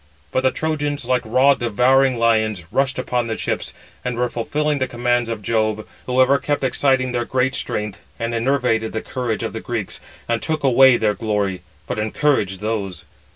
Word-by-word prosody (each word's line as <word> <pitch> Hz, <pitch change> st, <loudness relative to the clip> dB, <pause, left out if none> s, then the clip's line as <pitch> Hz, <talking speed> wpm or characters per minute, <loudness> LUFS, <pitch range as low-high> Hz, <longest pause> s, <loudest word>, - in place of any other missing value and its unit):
But 130 Hz, -, +1 dB
the 130 Hz, -, +3 dB
Trojans, 145 Hz, -2 st, -2 dB
like 125 Hz, 0 st, +1 dB
raw 130 Hz, +5 st, +4 dB
devouring 125 Hz, +2 st, +3 dB
lions, 110 Hz, -5 st, +2 dB
rushed 135 Hz, -1 st, +1 dB
upon 125 Hz, -2 st, -1 dB
the 110 Hz, -, -3 dB
ships, -, -, -2 dB, 0.3 s
and 125 Hz, -1 st, -3 dB
were 120 Hz, 0 st, 0 dB
fulfilling 150 Hz, +5 st, -1 dB
the 130 Hz, -, 0 dB
commands 120 Hz, -1 st, 0 dB
of 110 Hz, -2 st, -4 dB
Jove; 110 Hz, -1 st, 0 dB, 0.2 s
who 125 Hz, 0 st, 0 dB
ever 135 Hz, +2 st, +5 dB
kept 145 Hz, -1 st, -1 dB
exciting 130 Hz, 0 st, +2 dB
their 120 Hz, -1 st, 0 dB
great 130 Hz, +2 st, 0 dB
strength, 105 Hz, -4 st, -3 dB, 0.2 s
and 115 Hz, 0 st, -3 dB
enervated 115 Hz, -2 st, +1 dB
the 110 Hz, -, -3 dB
courage 120 Hz, -4 st, -3 dB
of 115 Hz, -, -3 dB
the 110 Hz, -, -4 dB
Greeks, 115 Hz, -5 st, -4 dB, 0.3 s
and 115 Hz, 0 st, 0 dB
took 155 Hz, -2 st, -2 dB
away 130 Hz, -1 st, +6 dB
their 110 Hz, -2 st, +1 dB
glory; 105 Hz, -4 st, -1 dB, 0.2 s
but 110 Hz, -, -3 dB
encouraged 105 Hz, -4 st, 0 dB
those. 105 Hz, -4 st, -3 dB
120 Hz, 180 wpm, -21 LUFS, 110-130 Hz, 0.3 s, away